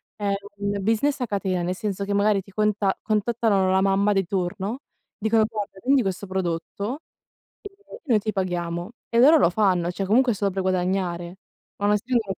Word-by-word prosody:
è 205 -2 -1 0.2
un 200 0 -2
business 225 +8 +1
a - - +1
catena, 195 -3 -1
nel 180 +1 -2
senso 200 -1 -3
che, 200 - -2
magari, 200 0 +2
ti 195 +1 -18
conta 210 -1 +1
contattano 215 -3 +1
la 190 0 +3
mamma 195 +1 +2
di 195 -1 +1
turno, 190 +5 -3 0.4
dicono: 220 +1 +2
"Guarda, 210 -3 -6
vendi 275 -1 +4
questo 195 -1 -3
prodotto 190 - -3 0.6
e 405 - -9 0.3
noi 230 -7 +3
ti 215 +1 -2
paghiamo." 175 -2 -3 0.2
e 230 - +1
loro 300 +6 +7
lo 170 - +4
fanno, 180 -3 +1
cioè, 185 +2 -3
comunque 240 +5 +3
è - - -6
solo 200 -1 0
per 190 - -2
guadagnare. 180 -1 -1 0.4
Ma 205 - -2
non 210 - +4
essendo 235 +3 0
200 Hz, 185 wpm, -24 LUFS, 185-215 Hz, 0.6 s, loro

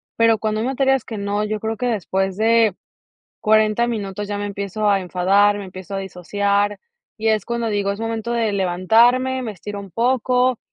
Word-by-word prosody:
pero 230 -1 +4
cuando 215 0 -2
hay 235 - -1
materias 270 -1 +1
que 225 - -6
no, 200 +1 -1
yo 215 0 -2
creo 220 +1 -3
que 250 - -1
después 190 -4 -1
de 225 -2 +3 0.7
40 215 +2 +3
minutos 205 -3 -4
ya 205 0 -3
me 205 - -3
empiezo 200 +1 -2
a 200 -1 +3
enfadar, 195 +3 +2
me 200 - -6
empiezo 185 0 -9
a - - -1
disociar, 200 +2 -1 0.4
y 220 +1 0
es 215 -3 +1
cuando 235 -1 -2
digo: 205 -2 0
"Es 200 - -8
momento 225 0 -3
de 230 -3 0
levantarme, 230 +8 +3
me 225 -3 -4
estiro 205 +2 -7
un 200 -1 -11
poco". 250 +3 +1
210 Hz, 190 wpm, -21 LUFS, 200-230 Hz, 0.7 s, pero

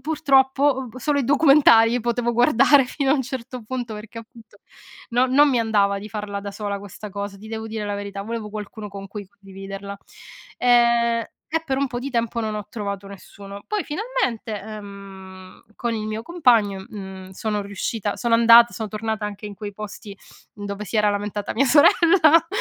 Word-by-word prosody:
purtroppo 270 -3 +2
solo 285 +3 0
i 265 - -2
documentari 270 -5 +5
potevo 240 +1 -1
guardare 265 +4 +5
fino 270 0 -1
a - - +5
un 270 - 0
certo 250 -1 -7
punto, 240 0 -5
perché 220 +2 -9
appunto, 230 -1 -15 0.5
no 245 +2 +3
non 285 +3 +5
mi 250 - +2
andava 200 -3 +1
di 210 - -9
farla 205 -1 -5
da 200 - -6
sola 200 0 -4
questa 205 +1 -10
cosa, 200 0 -6
ti 210 - -13
devo 220 0 -5
dire 220 -1 -4
la 205 - -3
verità. 200 0 -6
Volevo 225 0 -5
qualcuno 210 0 -7
con 195 0 -9
cui 205 0 -8
condividerla. 195 -1 -9 0.6
Ehm, 235 -1 +3 0.3
e 325 +1 0
per 270 -3 -1
un 280 - +1
po' 245 -1 -5
di 275 +3 -5
tempo 235 -1 -1
non 215 -1 -3
ho 210 -1 -5
trovato 200 -3 -5
nessuno. 200 0 -11
Poi 420 -1 -2
finalmente, 295 - -3
ehm, 195 -3 -11
con 235 -1 -2
il 215 -1 -4
mio 215 +1 -4
compagno, 230 - +2
mhmm, 190 -2 -9
sono 210 +1 -3
riuscita 200 +1 -3
sono 235 -1 +1
andata 235 +1 +7
son 220 -1 -4
tornata 220 0 -3
anche 210 0 -6
in 205 - -8
quei 205 0 -7
posti 205 0 -9 0.4
dove 205 0 -6
si 220 - -4
era 210 -1 +3
lamentata 205 0 -3
mia 270 - +3
sorella 325 +4 +5
220 Hz, 180 wpm, -22 LUFS, 200-250 Hz, 0.6 s, andata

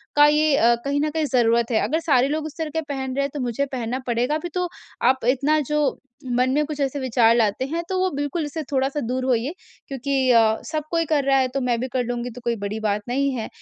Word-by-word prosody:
का 290 0 +7
ये 300 -1 +3
अ, 235 +1 +5
कहीं 285 +1 0
न 305 - +1
कहीं 315 -1 0
ज़रूरत 235 -3 +2
है। 220 - +2
अगर 320 +3 0
सारे 275 -6 +3
लोग 310 +1 -2
उस 310 - -8
तरह 315 -1 -2
के 320 - +1
पहन 270 -3 -4
रहे 280 - +1
हैं 280 - -1
तो 290 - -4
मुझे 245 +3 -1
पहनना 245 +1 -2
पड़ेगा। 245 +5 +1
अभी 345 +3 -4
तो 360 0 0 0.4
आप 260 -1 +3
इतना 285 +4 +2
जो 300 +2 -1 0.6
मन 255 +1 +3
में 300 +2 +2
कुछ 295 -1 -6
ऐसे 275 +1 -1
विचार 235 -3 +3
लाते 225 +2 +1
हैं 340 0 -1
तो 375 - -1
वो 375 0 +2
बिल्कुल 290 +3 -2
इससे 310 +2 -5
थोड़ा-सा 270 +2 0
दूर 255 0 -1
होइए। 250 +1 +1 0.4
क्योंकि 275 0 -3 0.2
अ, 225 -2 +4
सब 310 -1 -1
कोई 330 -1 +1
कर 295 -2 +1
रहा 275 0 +4
है, 260 - +2
तो 270 +1 -3
मैं 240 -2 0
भी 260 - -2
कर 255 - +1
लूँगी 245 0 -3
तो 250 - -9
कोई 235 -1 +1
बड़ी 215 +2 -3
बात 210 -1 0
नहीं 275 +2 +1
है। 225 - -3
270 Hz, 255 wpm, -23 LUFS, 245-300 Hz, 0.6 s, का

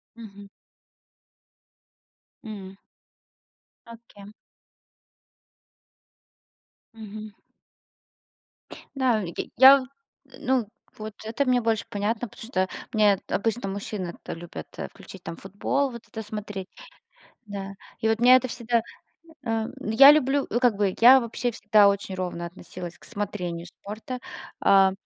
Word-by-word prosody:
Мгм. 205 -3 -11 2.0
М. 195 -3 -8 1.1
А 230 - -8
кем? 200 0 -14 2.6
Мгм. 215 -1 -9 1.6
Да, 255 -5 +2
я 175 -3 -6 0.2
я 265 +1 +9 0.6
ну, 255 -4 +1 0.3
вот 215 0 -7
это 225 +6 -1
мне 250 -1 +3
больше 225 -2 0
понятно, 215 +4 -2
потому 225 - -11
что 185 -6 0 0.2
мне 210 -4 +4
обычно 220 0 -1
мужчины 200 -1 -4
это - - -7
любят, 165 - -8
э, - - -4
включить - - -13
там - - -6
футбол, 205 +10 -1
вот 235 -1 -9
это 220 - -7
смотреть. 210 -2 -6 0.8
Да. 195 -1 -6 0.3
И 220 - 0
вот 220 0 +1
меня 250 +2 +8
это 255 0 +2
всегда 235 -1 0 0.7
Э, 225 -1 0
я 265 +6 +8
люблю, 285 -1 +3
э, 240 - +1
как 245 -3 +3
бы 200 -2 +1
я 255 +3 +9
вообще 235 +1 -3
всегда 210 -2 +5
очень 200 -1 -2
ровно 175 -2 -4
относилась 175 0 -9
к - - -17
смотрению 180 -6 -4
спорта, 215 +7 -8 0.4
а 195 -1 +5
215 Hz, 120 wpm, -25 LUFS, 195-235 Hz, 2.6 s, я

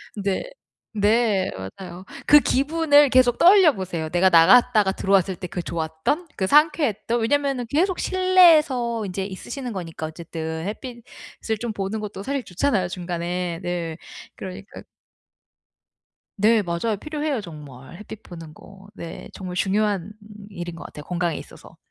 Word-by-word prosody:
네. 200 -2 -2 0.5
네. 210 -2 +2 0.3
맞아요. 180 -1 -9 0.2
그 295 - +8
기분을 290 +1 +3
계속 255 -2 +4
떠올려 365 -2 +7
보세요. 175 -5 -5
내가 180 +2 +3
나갔다가 200 +4 +5
들어왔을 190 -1 +1
때 180 - -6
그 180 - -5
좋았던, 165 - -3
그 190 -2 -1
상쾌했던 285 - +2
왜냐면은 275 +1 0
계속 355 - +1
실내에서 310 - +3
인제 190 0 -4
있으시는 245 +7 -7
거니까 165 -5 -6
어쨌든 160 0 -6
햇빛을 235 -1 -7
좀 235 - -3
보는 210 +1 -4
것도 205 -2 -7
사실 275 +1 -3
좋잖아요 185 -1 -1
중간에. 175 -1 -4
네. 175 -2 -4 0.4
그러니까 195 +2 -9 1.6
네 215 +2 +4
맞아요. 185 +5 -2
필요해요, 300 -3 -3
정말. 145 -6 -11
햇빛 215 0 -11
보는 165 -3 -11
거. 195 +4 -16
네. 170 -4 -9
정말 180 -2 -7
중요한 200 0 0 0.4
일인 175 -3 -7
것 170 - -9
같아요, 150 - -10
건강에 175 -1 -2
있어서. - - -13
200 Hz, 310 characters per minute, -23 LUFS, 175-250 Hz, 1.6 s, 그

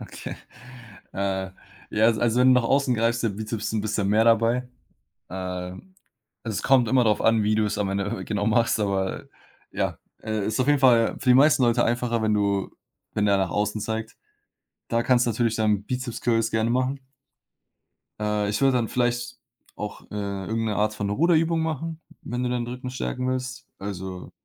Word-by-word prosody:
Okay. - - -8 0.8
Äh, 95 -1 -2 0.4
ja, 105 +1 +2
als 115 -2 +3
also 120 +2 +2
wenn 130 - +6
du 125 - +5
nach - - -5
außen 135 0 +2
greifst, 115 +1 +1
ist 115 - +2
der 100 - -8
Bizeps 110 0 -4
'n 110 - 0
bisschen 105 -1 -1
mehr 110 +2 +4
dabei. 115 +2 +3 0.6
Äh, - - -10
also, 90 -1 -5 0.6
es 110 -3 -3
kommt 130 -4 +4
immer 130 0 +3
darauf 110 -2 +2
an, 115 -1 +3
wie 105 +1 +2
du 110 0 +2
es 105 - -2
am 100 -2 0
Ende, 100 0 -1
äh, - - -5
genau 105 -1 -1
machst, 115 0 +2
aber 95 -2 -1 0.5
ja, - - -2 0.3
äh, 110 -2 -2
ist 110 +2 -2
auf 130 - +1
jeden 145 -1 +4
Fall 120 -4 +4
für 135 - -1
die - - +8
meisten 140 0 +5
Leute 120 -1 +3
einfacher, 120 -1 0
wenn 110 -1 +2
du 100 -2 0 0.4
wenn 105 - +1
der 100 -1 +3
nach 95 - 0
außen 105 +1 -1
zeigt. 110 0 -4 0.7
Da 115 0 +1
kannst 125 0 +3
du - - +2
natürlich 115 0 0
dann 105 -2 +1
Bizeps 125 0 -4
Curls 115 -1 +1
gerne 110 +1 +1
machen. 130 +3 0 1.2
Äh, 105 -1 0
ich 105 - -1
würde 135 -1 +4
dann 115 -2 -1
vielleicht 120 0 -1 0.4
auch, 105 -1 -6
äh, 100 -2 -4
irgend 115 0 -1
'ne 105 -2 -1
Art 105 +1 +1
von 100 -1 -3
Ruderübung 165 +6 +2
machen, 160 +1 -3 0.2
wenn 125 +1 -4
du 125 - 0
deinen 125 -1 -2
Rücken 125 +1 -6
stärken 130 0 -3
willst. 130 +1 -4
Also 95 -2 -6
115 Hz, 195 wpm, -25 LUFS, 105-125 Hz, 1.2 s, die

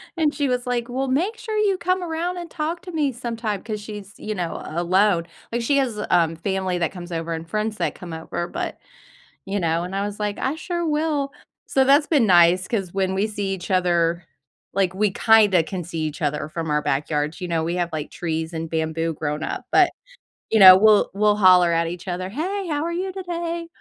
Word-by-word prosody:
and 310 -3 +1
she 285 -1 0
was 250 0 -1
like, 245 -1 -1
"Well, 265 +2 -2
make 350 - 0
sure 440 -1 -4
you 405 -3 +2
come 365 +1 0
around 345 +1 -3
and 345 -2 -7
talk 325 +2 -3
to 360 - -8
me 295 -4 +1
sometime" 230 -4 -4
'cause 215 -2 -5
she's, 205 -1 -9
you 215 - -4
know, 175 -4 -3
a 170 +2 -3
alone, 180 -1 +2 0.2
like, 235 +1 -1
she 280 +5 +1
has, 245 -6 0
um, 165 -2 +2
family 190 0 -1
that 170 -1 -1
comes 175 -1 -9
over 165 0 -3
and 165 0 -6
friends 215 +2 -1
that - - -1
come 175 -3 -9
over, 165 +2 -4
but - - -4 0.7
you 195 0 -2
know? 165 0 0
And, 180 +2 -6
I 200 - 0
was 205 0 -6
like, 210 -1 -2
"I 265 - -1
sure 345 +1 -3
will." 300 -2 0 0.4
So, 265 - +2
that's 285 +3 +5
been 285 -8 +3
nice 180 0 +5
'cause 195 -6 -2
when 190 -1 0
we 195 +2 +1
see 205 -2 -3
each 180 -1 -6
other, 175 -2 +1 0.5
like, 190 -2 +1
we 205 +1 +1
kinda 205 -4 +5
can 180 +1 -5
see 165 0 -5
each 155 0 -4
other 150 +1 -1
from 165 0 -4
our 150 0 +2
backyards, 150 +3 -1
you 180 - -3
know, 165 -1 0
we 170 +2 -2
have, 175 -1 -1
like, 155 -2 -4
trees 160 -1 -3
and 160 0 -4
bamboo 160 0 -1
growing 150 0 -3
up, - - -4
but, - - +5 0.6
you 220 - +3
know, 185 -2 +11
we'll 210 +2 +5
we'll 210 +1 +3
holler 185 -3 +6
at 165 0 +2
each 175 +3 -7
other, 185 +1 -3
"Hey, 370 - -3
how 300 -2 -1
are 340 - -2
you 370 +2 -2
today?" 340 -2 -4
200 Hz, 220 wpm, -23 LUFS, 170-275 Hz, 0.7 s, know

